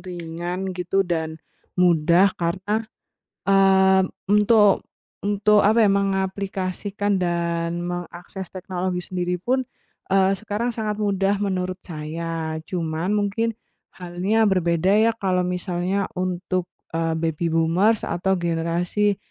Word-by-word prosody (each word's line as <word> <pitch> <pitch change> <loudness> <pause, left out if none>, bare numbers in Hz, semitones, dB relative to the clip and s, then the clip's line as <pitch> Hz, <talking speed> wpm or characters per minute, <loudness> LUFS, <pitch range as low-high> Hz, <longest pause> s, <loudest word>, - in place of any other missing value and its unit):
ringan 175 +1 -5
gitu, 180 +2 0
dan 160 -2 -2 0.4
mudah 175 +2 +4
karena, 200 +6 -1 0.6
eee, 190 -1 +5 0.2
untuk 210 0 +4 0.4
untuk, 205 0 +3
apa 220 +2 +5
ya, 210 - +5
mengaplikasikan 195 0 -1
dan 170 -1 -1
mengakses 175 +2 -6
teknologi 185 -1 -3
sendiri 180 -1 -3
pun, 260 +4 0 0.5
eee, 195 0 +3
sekarang 220 +3 -2
sangat 215 -2 -2
mudah 200 -1 +1
menurut 185 -2 -2
saya. 160 0 -4
Cuman 165 0 -3
mungkin 210 +2 0 0.4
halnya 185 +5 0
berbeda 180 -2 +2
ya, 230 +1 +4
kalau 185 -3 +1
misalnya 180 +2 -1
untuk, 185 0 -2 0.3
eee, 165 0 0
Baby 165 +1 -1
Boomers 170 +7 +2
atau 185 +2 0
generasi 175 +4 0
185 Hz, 110 wpm, -23 LUFS, 175-200 Hz, 0.6 s, eee